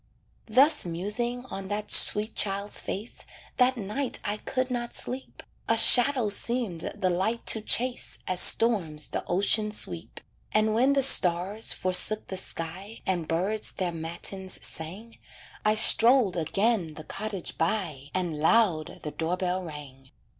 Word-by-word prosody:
Thus 265 Hz, +8 st, +3 dB
musing 210 Hz, +9 st, -4 dB
on 195 Hz, 0 st, -6 dB
that 210 Hz, +1 st, -4 dB
sweet 215 Hz, +2 st, +4 dB
child's 200 Hz, 0 st, -1 dB
face 210 Hz, +5 st, -7 dB, 0.3 s
That 255 Hz, 0 st, +2 dB
night 225 Hz, +6 st, -4 dB
I 205 Hz, +1 st, -2 dB
could 255 Hz, +3 st, -3 dB
not 240 Hz, -1 st, -4 dB
sleep, 260 Hz, +1 st, -5 dB, 0.3 s
A 225 Hz, -, +3 dB
shadow 245 Hz, 0 st, +6 dB
seemed 205 Hz, -5 st, -3 dB
the 190 Hz, -3 st, -1 dB
light 205 Hz, +7 st, -2 dB
to 220 Hz, -, -5 dB
chase 245 Hz, +3 st, +1 dB
As 185 Hz, -1 st, 0 dB
storms 180 Hz, -12 st, +2 dB
the -, -, -4 dB
ocean 205 Hz, +4 st, +1 dB
sweep; 90 Hz, -, -4 dB, 0.3 s
And 215 Hz, 0 st, +2 dB
when 255 Hz, +5 st, +2 dB
the 275 Hz, -1 st, +2 dB
stars 190 Hz, -1 st, +3 dB
forsook 185 Hz, +4 st, +2 dB
the 190 Hz, -, -5 dB
sky 185 Hz, +4 st, -5 dB
And 175 Hz, -4 st, -2 dB
birds 195 Hz, +6 st, -1 dB
their 185 Hz, -3 st, -3 dB
matins 170 Hz, +3 st, -5 dB
sang 195 Hz, +9 st, -6 dB, 0.4 s
I 215 Hz, 0 st, +2 dB
strolled 230 Hz, -2 st, +5 dB
again 180 Hz, 0 st, -1 dB
the 155 Hz, -, -9 dB
cottage 200 Hz, +1 st, -6 dB
by 160 Hz, -6 st, -2 dB
And 175 Hz, -5 st, -2 dB
loud 165 Hz, -2 st, +1 dB
the 150 Hz, -, -5 dB
door 165 Hz, +4 st, -3 dB
bell 185 Hz, 0 st, -2 dB
rang. 145 Hz, -5 st, -11 dB
200 Hz, 145 wpm, -26 LUFS, 175-230 Hz, 0.4 s, shadow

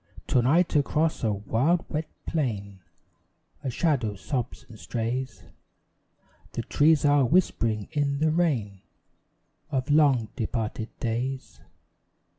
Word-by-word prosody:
To 125 Hz, -, +4 dB
night 160 Hz, +8 st, +3 dB
across 150 Hz, +2 st, +1 dB
a 110 Hz, -, +2 dB
wild 115 Hz, -, +1 dB
wet 155 Hz, +1 st, -3 dB, 0.2 s
plain 100 Hz, -, -2 dB, 0.8 s
A 135 Hz, -, -1 dB
shadow 125 Hz, -6 st, 0 dB
sobs 125 Hz, +4 st, -4 dB
and 110 Hz, -2 st, -13 dB
strays; 125 Hz, +3 st, -3 dB, 1.1 s
The -, -, -3 dB
trees 150 Hz, 0 st, +3 dB
are 145 Hz, -1 st, +5 dB
whispering 115 Hz, -, +1 dB
in 145 Hz, -2 st, 0 dB
the 155 Hz, +2 st, +2 dB
rain 125 Hz, -, 0 dB, 0.9 s
Of 135 Hz, 0 st, -1 dB
long 140 Hz, -7 st, +4 dB
departed 110 Hz, -2 st, -3 dB
days. 125 Hz, +3 st, -3 dB
130 Hz, 110 wpm, -26 LUFS, 115-150 Hz, 1.1 s, are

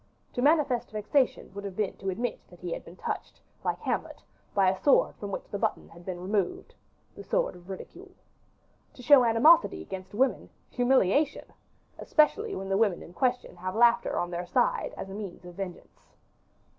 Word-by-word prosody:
To 245 Hz, -, -2 dB
manifest 285 Hz, -4 st, +3 dB
vexation 215 Hz, +2 st, 0 dB
would 200 Hz, 0 st, -7 dB
have 195 Hz, -2 st, -6 dB
been 210 Hz, -2 st, -1 dB
to 195 Hz, -, -4 dB
admit 230 Hz, +5 st, -2 dB
that 175 Hz, -, -17 dB
he 175 Hz, -1 st, -5 dB
had -, -, -6 dB
been 170 Hz, -, -13 dB
touched, -, -, -5 dB, 0.2 s
like -, -, 0 dB
Hamlet, -, -, -3 dB, 0.3 s
by 195 Hz, -2 st, +4 dB
a 185 Hz, 0 st, +1 dB
sword 285 Hz, -, +4 dB
from 205 Hz, -, -6 dB
which 200 Hz, -, -5 dB
the 200 Hz, -, -3 dB
button -, -, -1 dB
had 170 Hz, +1 st, -15 dB
been 180 Hz, -2 st, -4 dB
removed 190 Hz, 0 st, -2 dB, 0.4 s
the -, -, -9 dB
sword -, -, 0 dB
of 175 Hz, +1 st, -15 dB
ridicule. 190 Hz, -, -9 dB, 0.9 s
To 250 Hz, -, -12 dB
show 280 Hz, 0 st, +7 dB
animosity 285 Hz, +9 st, +5 dB
against 190 Hz, +1 st, -8 dB
women 260 Hz, +4 st, +1 dB, 0.2 s
humiliation! 260 Hz, -, +2 dB, 0.5 s
especially 400 Hz, +8 st, +2 dB
when 195 Hz, 0 st, -5 dB
the 195 Hz, -, +2 dB
women 205 Hz, -5 st, +1 dB
in 170 Hz, -, -13 dB
question 250 Hz, 0 st, -1 dB
have 185 Hz, +2 st, -4 dB
laughter 235 Hz, +1 st, +4 dB
on 175 Hz, -, -1 dB
their 175 Hz, 0 st, -4 dB
side, -, -, +1 dB
as 195 Hz, -, -6 dB
a -, -, -6 dB
means 195 Hz, -3 st, -7 dB
of 175 Hz, -, -10 dB
vengeance. 180 Hz, -1 st, -9 dB
205 Hz, 180 wpm, -28 LUFS, 185-250 Hz, 0.9 s, show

